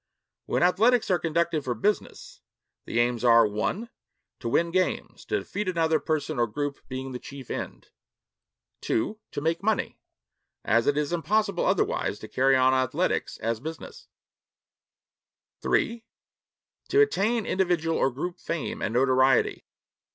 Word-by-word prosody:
When - - +1
athletics 220 +5 +3
are 180 - +3
conducted 165 -1 0
for 125 -2 -2
business, - - -2 0.4
the - - -4
aims 120 -1 +1
are 115 -1 +6
(1) 105 - -2 0.5
to 120 - -3
win 170 +7 +1
games 185 +1 -1
to - - 0
defeat 210 -1 -4
another 160 -3 +2
person 155 -3 -2
or 120 - +3
group 145 +6 -3
being 130 0 -5
the 125 - -5
chief 140 -1 -10
end; - - -6 0.9
(2) 210 - -1
to - - -4
make 165 +3 0
money 215 +1 -1 0.7
as 115 +1 +2
it 145 0 +2
is 150 +2 -1
impossible 200 +3 +1
otherwise - - 0
to - - -9
carry 135 +1 +3
on 130 0 +4
athletics 130 +7 0
as 115 0 -1
business; 160 +5 -8 1.5
(3) 230 0 0 0.9
to 415 - +3
attain 235 - +1
individual 175 -3 +1
or - - +2
group 175 +8 -5
fame 165 -3 -4
and 110 - -2
notoriety. 130 0 +3
155 Hz, 140 wpm, -26 LUFS, 130-185 Hz, 1.5 s, are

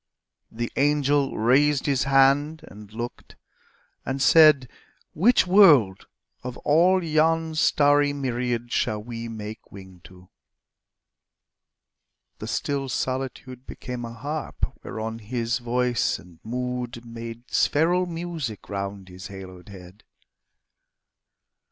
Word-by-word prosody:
The 120 +1 -4
angel 145 -1 +1
raised 135 +5 +3
his 140 -3 +1
hand 140 +3 +3
and 105 0 -13
looked 120 +2 -7 0.7
and 135 +1 -3
said, 150 -2 +6 0.5
"Which 225 +8 +4
world, 150 - +5 0.3
of 125 -1 -7
all 180 +5 +4
yon 160 0 +1
starry 145 -2 +3
myriad 120 -3 -3
Shall 105 -3 -1
we 115 0 -6
make 110 -1 -8
wing 95 -2 -13
to?" 90 0 -16 2.1
The - - -6
still 140 -2 -2
solitude 130 0 -4
Became 125 -1 -7
a 115 0 -7
harp 145 +5 -4
whereon 110 +1 -5
his 115 +2 -2
voice 120 0 0
and 90 -3 -17
mood 125 0 -4
Made 115 +1 -9
spheral 175 +4 +2
music 165 - -6
round 100 -1 -5
his 90 +1 -10
haloed 95 -1 -11
head. 95 0 -13
125 Hz, 110 wpm, -24 LUFS, 110-145 Hz, 2.1 s, said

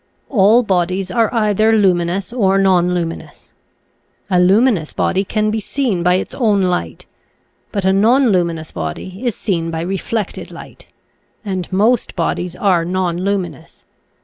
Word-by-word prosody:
All 220 +1 +4
bodies 185 -1 -1
are 225 +3 +1
either 215 -1 +2
luminous 185 -1 +1
or 195 -6 +2
nonlumin 180 -3 +1
ous. - - -25 0.8
A 180 - +3
luminous 195 -2 +3
body 195 - 0
can 215 +1 -1
be 220 - -1
seen 220 -4 -2
by 180 +1 +3
its 185 - -3
own 210 -6 +1
light, 130 - -2 0.7
but 200 -2 -2
a 190 - +3
nonluminous 195 - +2
body 180 - -6
is 240 -4 -1
seen 170 -5 -2
by 165 0 -3
re 190 +3 -2
flected 220 -4 -4
light, - - -12 0.6
and 190 -3 -4
most 220 +6 +1
bodies 175 +1 -2
are 180 -4 +1
nonluminous. 180 0 -3
190 Hz, 140 wpm, -17 LUFS, 175-215 Hz, 0.8 s, All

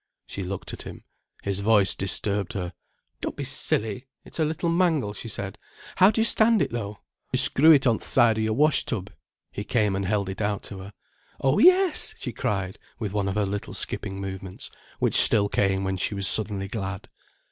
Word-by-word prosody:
She 100 - -7
looked 95 +1 -6
at - - -8
him. - - -10 0.4
His 100 -1 -2
voice 100 -1 +3
disturbed 100 +1 -1
her. 90 -2 -4 0.5
"Don't - - -4
be - - -5
silly. 110 +4 -1 0.2
It's - - -6
a - - +3
little 160 +3 -2
mangle," 165 - +1
she 115 - -9
said. 100 -3 -6 0.4
"How 185 - +7
do 220 - -1
you - - +3
stand 225 -1 +3
it, - - 0
though?" 105 -3 -5 0.3
"You - - +1
screw 155 +4 +6
it 140 -3 +5
on 115 -3 +3
th' - - -12
side 115 -3 +3
o' - - 0
your 110 0 0
wash 150 +3 +3
tub." 100 -5 -4 0.4
He 100 - -5
came 105 -3 0
and 95 -1 -2
held 100 -1 0
it 95 +2 -5
out 105 -1 -1
to 100 - -8
her. 100 +2 -10 0.5
"Oh, 135 +1 +2
yes!" 365 -1 +4
she 125 - -5
cried, 95 -2 -3 0.2
with 105 -4 -4
one 100 -2 -1
of 95 - -2
her 105 -1 +1
little 100 +1 -5
skipping 95 -1 -5
movements, 95 -1 -7 0.3
which - - +4
still 100 -2 +5
came 95 -1 0
when 95 0 -2
she 100 - -2
was 100 -1 +2
suddenly 100 -3 +3
glad. 100 -2 -5
105 Hz, 205 wpm, -25 LUFS, 95-125 Hz, 0.5 s, How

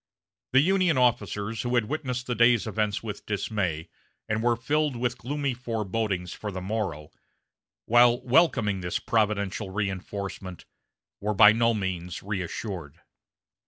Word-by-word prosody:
The 135 - +7
Union 185 -2 +2
officers 110 -3 0
who 125 0 -1
had 120 -3 +2
witnessed 130 -2 -3
the 125 - -1
day's 120 -1 +4
events 105 -1 -1
with 105 -2 -7
dismay, 95 -6 -2 0.4
and 110 0 -1
were 120 0 +3
filled 145 +3 0
with 120 0 -2
gloomy 140 +1 -2
forebodings 110 -6 -2
for 105 - -6
the 95 - -5
morrow, 95 -7 -3 0.7
while 120 +1 +5
welcoming 120 - +3
this 90 -1 -2
providential 105 -2 0
reinforcement, 95 -1 -5 0.5
were 105 +1 -2
by 105 +2 +9
no 115 +1 +2
means 90 -3 -4
reassured. 90 -4 -5
110 Hz, 130 wpm, -27 LUFS, 95-120 Hz, 0.7 s, by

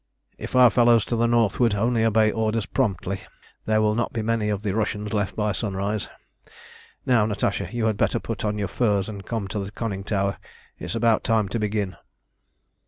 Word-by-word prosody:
"If - - -6
our 125 -2 +7
fellows 120 -2 +4
to 120 - -2
the 115 +1 +2
northward 115 -1 +2
only 115 +2 +1
obey 110 -1 +3
orders 110 0 -1
promptly, 95 -6 -1 0.4
there 110 0 +2
will 105 0 +2
not 120 +1 -1
be 110 - -3
many 110 -1 0
of 105 0 -2
the 100 -3 -1
Russians 105 -1 -2
left 100 -2 -1
by 105 -1 0
sunrise. 100 +1 -2 1.0
Now, 115 -5 +3
Natasha, 105 - -1
you 120 -1 -1
had 110 -2 +1
better - - +1
put - - -5
on 105 0 -1
your 100 -1 -1
furs 100 -2 0
and 100 -3 -7
come 110 -3 -3
to 105 - -3
the 100 0 -4
conning 100 -2 -4
tower; 100 -1 -1 0.4
it's - - -5
about 115 -1 +2
time 110 -3 +1
to 115 - -2
begin." 105 -4 -2
110 Hz, 190 wpm, -24 LUFS, 100-115 Hz, 1.0 s, our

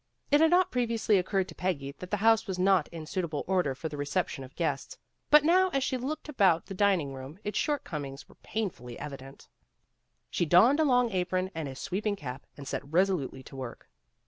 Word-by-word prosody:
It 290 +2 +5
had 320 - +6
not 365 +1 +4
previously 230 -4 +2
occurred 190 +1 0
to - - -8
Peggy 145 -7 -2
that 180 - -8
the 210 - 0
house 225 -1 +5
was 190 -2 -3
not 185 -3 +3
in 165 -2 -8
suitable 165 -2 -3
order 180 -8 +1
for 160 - -4
the 150 - -7
reception 145 -1 -2
of 130 +2 -13
guests, 150 -5 -2 0.3
but 300 0 +7
now 370 +4 +4
as 275 -1 +1
she 260 - 0
looked 285 +6 -4
about 195 - +3
the 195 - -7
dining 185 -8 +2
room 135 +4 -9
its 210 0 -2
shortcomings 145 - -3
were - - -18
pain 215 -3 -2
fully 120 -3 -10
evident. 135 -2 -9 0.8
She 175 - 0
donned 230 - +6
a 315 - +4
long 250 -3 +3
apron 185 0 -1
and 160 -2 -4
a 135 - -8
sweeping 205 +8 -2
cap, 135 -6 -8
and 140 -1 -9
set - - -2
resolutely 170 -7 +1
to 135 - -12
work. 130 -3 -8
185 Hz, 205 wpm, -29 LUFS, 145-225 Hz, 0.8 s, but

